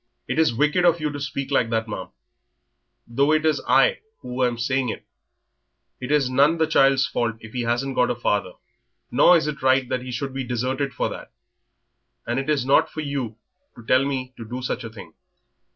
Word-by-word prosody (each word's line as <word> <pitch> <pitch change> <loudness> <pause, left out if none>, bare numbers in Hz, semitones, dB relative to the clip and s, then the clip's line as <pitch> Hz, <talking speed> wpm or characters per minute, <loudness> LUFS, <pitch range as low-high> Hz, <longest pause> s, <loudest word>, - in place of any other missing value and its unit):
"It - - -1
is 160 -5 +4
wicked 150 +9 +1
of 170 -1 +4
you 150 -1 -2
to 145 - -6
speak 140 0 -4
like 120 -4 +2
that, 115 -1 -1
ma'am, 100 -3 -5 1.0
though 140 +5 +1
it 155 0 +1
is 155 -2 +2
I - - +4 0.2
who 125 +1 -3
am 120 -1 0
saying 130 +1 0
it. - - -6 0.9
It 130 +2 -5
is 150 -3 +3
none 140 +5 +4
of - - -5
the 160 - +2
child's 135 -3 +3
fault 115 -2 -1
if 110 0 -12
he 125 - -2
hasn't 120 +3 -1
got 125 -1 +2
a - - 0
father, 100 -5 -1 0.6
nor 180 - +6
is 155 - -1
it 150 -2 -4
right 130 0 +3
that 125 - -1
he 130 - -8
should 130 +2 -4
be 135 0 -3
deserted 130 +3 -2
for - - -2
that... - - -9 0.9
and 120 +2 -1
it 135 - -4
is 140 -4 +1
not 135 - +4
for 155 - -6
you 140 -7 -4 0.4
to 120 - -14
tell 130 +3 +4
me 130 -2 -3
to 115 - -7
do 125 +3 -6
such 125 - -3
a 115 - -6
thing. 110 -1 -12
130 Hz, 215 wpm, -23 LUFS, 120-145 Hz, 1.0 s, nor